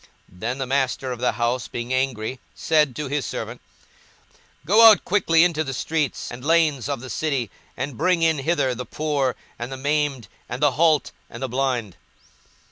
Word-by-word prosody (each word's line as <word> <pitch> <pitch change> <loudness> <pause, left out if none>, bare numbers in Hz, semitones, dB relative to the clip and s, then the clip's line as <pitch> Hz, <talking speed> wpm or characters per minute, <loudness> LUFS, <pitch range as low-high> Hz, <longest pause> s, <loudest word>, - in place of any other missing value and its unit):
Then 115 +8 -4
the 135 - -2
master 130 -1 -1
of 125 - -5
the 125 - +1
house 120 -1 -1
being 120 +2 -4
angry 130 -2 -1 0.2
said 150 -5 +2
to 150 -1 -4
his 145 0 -1
servant, - - -5 1.0
Go 220 +7 +8
out 215 - +4
quickly 170 -4 +3
into 165 -3 +1
the 135 -3 -5
streets 155 -2 -2
and 120 +1 -9
lanes 150 -4 +2
of 140 -4 -2
the 130 - -8
city, 135 -9 -1 0.3
and 135 -5 -4
bring 180 -2 +2
in 160 -3 +3
hither 135 -3 +1
the 125 +1 -5
poor, 140 -1 -1 0.2
and 120 +2 -5
the 135 - -5
maimed, 145 -3 -1 0.2
and 125 - -4
the 145 -1 +4
halt, 155 +2 +2 0.2
and 120 +3 -8
the - - -1
blind. 120 -7 -1
135 Hz, 180 wpm, -23 LUFS, 125-155 Hz, 1.0 s, Go